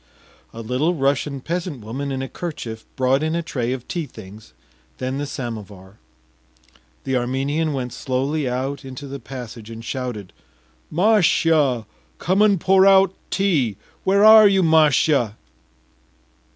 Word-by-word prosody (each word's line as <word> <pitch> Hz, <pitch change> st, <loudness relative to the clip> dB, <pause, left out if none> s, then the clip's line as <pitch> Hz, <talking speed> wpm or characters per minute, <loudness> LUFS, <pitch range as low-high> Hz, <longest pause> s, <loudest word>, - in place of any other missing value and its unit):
A 115 Hz, -, -8 dB
Little 130 Hz, +10 st, 0 dB
Russian 140 Hz, -1 st, -1 dB
peasant 170 Hz, -4 st, -4 dB
woman 130 Hz, +6 st, -5 dB
in 135 Hz, 0 st, -3 dB
a -, -, -4 dB
kerchief 120 Hz, -10 st, -7 dB
brought 130 Hz, +2 st, +2 dB
in 160 Hz, +1 st, -1 dB
a 170 Hz, -, -1 dB
tray 125 Hz, -6 st, -3 dB
of 130 Hz, -2 st, -5 dB
tea 170 Hz, -4 st, -3 dB
things, 105 Hz, -, -13 dB, 0.5 s
then 130 Hz, +2 st, -3 dB
the 145 Hz, -, -3 dB
samovar. 105 Hz, -7 st, -8 dB, 1.0 s
The 130 Hz, -, -2 dB
Armenian 135 Hz, +6 st, -1 dB
went 125 Hz, -3 st, -4 dB
slowly 135 Hz, +2 st, -2 dB
out 135 Hz, +3 st, -3 dB
into 130 Hz, +1 st, -8 dB
the 140 Hz, 0 st, -7 dB
passage 115 Hz, -3 st, -9 dB
and 115 Hz, 0 st, -9 dB
shouted: 120 Hz, -7 st, -5 dB, 0.6 s
“Mashya, 160 Hz, -, +3 dB, 0.3 s
come 185 Hz, +4 st, +1 dB
and 205 Hz, -3 st, +4 dB
pour 190 Hz, +2 st, +4 dB
out 195 Hz, -1 st, +5 dB, 0.2 s
tea! 150 Hz, -, 0 dB, 0.3 s
Where 200 Hz, +2 st, +3 dB
are 215 Hz, -1 st, +9 dB
you, 195 Hz, -2 st, +3 dB
Mashya? 150 Hz, -7 st, +3 dB
135 Hz, 140 wpm, -21 LUFS, 125-165 Hz, 1.0 s, are